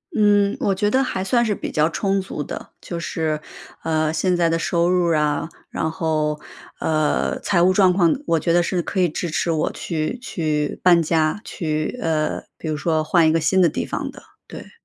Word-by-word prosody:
嗯。 205 -2 +3
我 195 - +1
觉 205 +2 +1
得 265 +3 +3
还 190 -7 -2
算 235 +4 +2
是 210 -2 0
比 - - -5
较 155 +1 +2
充 195 +3 0
足 185 -5 -5
的。 - - -7
就 170 -1 -5
是， 160 -2 -2 0.4
呃， 155 -1 +1
现 180 +3 +1
在 170 -1 +2
的 165 - +1
收 170 +1 +1
入 175 -2 +2
啊， 150 +1 0 0.2
然 160 - -2
后， 155 -2 -1 0.4
呃， 155 -1 0
财 175 -3 +1
务 185 - +5
状 190 -2 +4
况 175 -3 +3
我 165 - +2
觉 165 - 0
得 175 - +5
是 180 0 -1
可 185 - -3
以 180 - +4
支 170 +3 -3
持 165 +2 0
我 155 -2 0
去 160 +8 -3
去 155 - -2
搬 175 -2 +6
家， 160 +2 +1
去 155 +6 -3
呃， 155 -2 0 0.2
比 - - -7
如 155 - -1
说 155 +1 0
换 165 +1 +3
一 - - +4
个 165 - +2
新 185 +4 +2
的 170 - +5
地 - - -3
方 - - -4
的， - - -14 0.3
对。 - - -10
165 Hz, 220 characters per minute, -21 LUFS, 155-185 Hz, 0.4 s, 搬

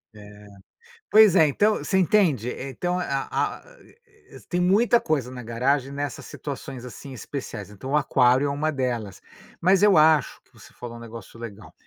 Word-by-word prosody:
É. 105 0 -13 0.7
Pois 215 -3 +7
é, 160 -4 +6
então, 205 +9 +2
você 190 - -1
entende? 170 - +2
Eh, 135 +2 -6
então 175 +7 -2
a 180 - -2
a 135 0 -2
a - - -19
e - - -22 0.4
e - - -13
tem 175 - -1
muita 220 +7 +4
coisa 140 - -1
na 125 -1 -8
garagem 130 +4 0
nessas 145 0 -5
situações, 135 -2 -7
assim, 135 +2 -10
especiais, 110 -3 -7
então 105 +6 -8
o - - +2
aquário 130 -1 +3
é - - -1
uma 145 +3 -1
delas. 120 -8 -3 0.4
Mas 190 +3 +4
eu 205 -4 +6
acho 155 -1 +3
que - - -34
você - - -17
falou 120 -1 -9
um - - -11
negócio 115 -2 -11
legal, 110 -2 -10
140 Hz, 185 wpm, -24 LUFS, 120-175 Hz, 0.7 s, Pois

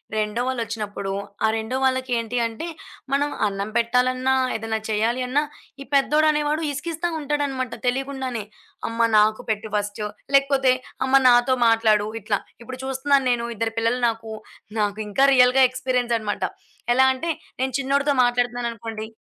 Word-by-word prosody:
రెండో 215 +2 -1
వాళ్ళొచ్చినప్పుడు, 220 -5 -3 0.3
ఆ - - +4
రెండో 220 +3 -3
వాళ్ళకేంటి 250 -3 0
అంటే, 230 +8 -5 0.4
మనం 285 +1 +2 0.2
అన్నం 200 +1 -3
పెట్టాలన్నా 255 +2 +2 0.2
ఏదైనా 220 0 -2
చేయాలి 225 +4 0
అన్న, 265 +3 +2 0.4
ఈ - - -4
పెద్దోడనేవాడు 300 +2 +2
ఇసికిస్తా 325 +4 -3
ఉంటాడనమాట 280 -4 -2
తెలీకుండానే. 260 -2 -2 0.5
అమ్మ 230 +1 -6 0.2
నాకు 215 +1 +3
పెట్టు 220 0 -2
ఫస్టు, 205 0 -2 0.3
లేకపోతే 275 -1 +4 0.3
అమ్మ 260 - -3 0.2
నాతో 245 +1 +4
మాట్లాడు 220 -2 +3
ఇట్లా. 205 0 0 0.2
ఇప్పుడు 255 +2 -8
చూస్తున్నాను 270 +1 +1
నేను. 235 -1 0
ఇద్దరు 225 0 -1
పిల్లలు 230 +2 0
నాకు. 225 -1 -6 0.5
నాకింకా 210 +4 +1
రియల్‌గా 250 +1 +6
ఎక్స్‌పీరియన్సనమాట. 245 -4 -1 0.5
ఎలా 260 +2 +5
అంటే, 330 +6 -3 0.3
నేను 260 -1 -1
చిన్నోడితో 280 +1 +1
మాట్లాడుతున్నాననుకోండి 235 -2 -2
245 Hz, 125 wpm, -23 LUFS, 220-265 Hz, 0.5 s, రియల్‌గా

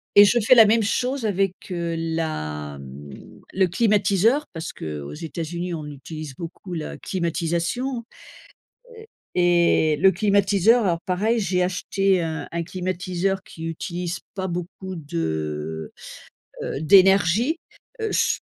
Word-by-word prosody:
et 205 0 +10
je 240 +4 +3
fais 250 +4 +6
la 225 -2 +9
même 220 +1 +3
chose 250 +3 -1
avec, 195 -2 +1 0.2
heu, 170 -1 -2
la, 75 - -3
mmh, 70 +1 -11
le 190 0 +3
climatiseur 210 - +2
parce 165 -2 -6
qu'aux 75 -2 -6
États-Unis, 170 - -5
on 155 -2 -5
utilise 145 0 -8
beaucoup 175 +2 -8
la 160 -2 -5
climatisation. 175 +8 -2 0.9
Heu, 445 - -11 0.3
et 170 -3 +3
le 190 +5 +5
climatiseur, 205 +2 +3
alors 170 -3 +1
pareil, 215 +6 +1
j'ai 180 -2 +1
acheté 190 0 +1
un 160 -1 -3
un 170 0 -1
climatiseur 185 +2 -2
qui 165 -3 -10
utilise 175 +2 -4
pas 190 -1 -3
beaucoup 185 +2 -5
de, 80 - -4 0.7
heu - - -3
heu, - - -5
d'énergie. 195 - +5 0.4
Heu, 440 - -1
je, - - +2
180 Hz, 135 wpm, -23 LUFS, 160-200 Hz, 0.9 s, et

